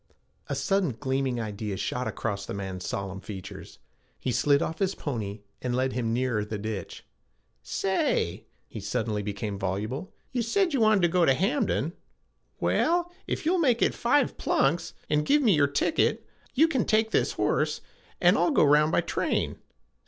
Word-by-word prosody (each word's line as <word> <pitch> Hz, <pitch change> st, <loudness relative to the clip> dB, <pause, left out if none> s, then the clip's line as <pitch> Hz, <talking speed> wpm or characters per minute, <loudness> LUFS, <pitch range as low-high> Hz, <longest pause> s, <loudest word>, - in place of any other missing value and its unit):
A -, -, -2 dB
sudden 190 Hz, -, 0 dB
gleaming 130 Hz, -2 st, -1 dB
idea 105 Hz, -2 st, -4 dB
shot 125 Hz, +5 st, -2 dB
across 100 Hz, -3 st, -3 dB
the -, -, -4 dB
man's 95 Hz, -2 st, -5 dB
solemn 95 Hz, -1 st, -4 dB
features. 95 Hz, -3 st, -9 dB, 0.4 s
He 130 Hz, -, -2 dB
slid 140 Hz, +3 st, +3 dB
off 160 Hz, +2 st, -3 dB
his 195 Hz, 0 st, 0 dB
pony 105 Hz, -7 st, -4 dB, 0.2 s
and 125 Hz, -1 st, -1 dB
led 130 Hz, +1 st, 0 dB
him 120 Hz, -2 st, -1 dB
nearer 120 Hz, -3 st, 0 dB
the 105 Hz, 0 st, -4 dB
ditch. 105 Hz, -2 st, -6 dB, 0.6 s
'Say' -, -, -1 dB, 0.2 s
he -, -, -8 dB
suddenly 105 Hz, 0 st, -2 dB
became 100 Hz, 0 st, -4 dB
voluble, 110 Hz, -, -3 dB, 0.2 s
'you 245 Hz, -, 0 dB
said 345 Hz, -, +1 dB
you 270 Hz, -, +2 dB
wanted 215 Hz, -4 st, +4 dB
to -, -, +6 dB
get 170 Hz, -, +5 dB
to 135 Hz, -, +5 dB
Hamden. 195 Hz, -, 0 dB, 0.7 s
Well, 350 Hz, +1 st, +1 dB, 0.2 s
if -, -, -3 dB
you'll 355 Hz, +3 st, +3 dB
make 250 Hz, -8 st, +3 dB
it -, -, +3 dB
five 265 Hz, +5 st, +1 dB
plunks, -, -, +1 dB
and 150 Hz, 0 st, +2 dB
give 290 Hz, -, +3 dB
me 220 Hz, -6 st, +5 dB
your 145 Hz, -3 st, +4 dB
ticket, 140 Hz, -, +1 dB, 0.3 s
you 315 Hz, +5 st, +6 dB
can 265 Hz, -9 st, +1 dB
take 220 Hz, +1 st, +2 dB
this -, -, +2 dB
horse, -, -, 0 dB, 0.4 s
an' -, -, +5 dB
I'll -, -, +3 dB
go 290 Hz, -, +4 dB
round 150 Hz, +1 st, +5 dB
by -, -, +3 dB
train. -, -, -1 dB
135 Hz, 170 wpm, -27 LUFS, -, 0.7 s, to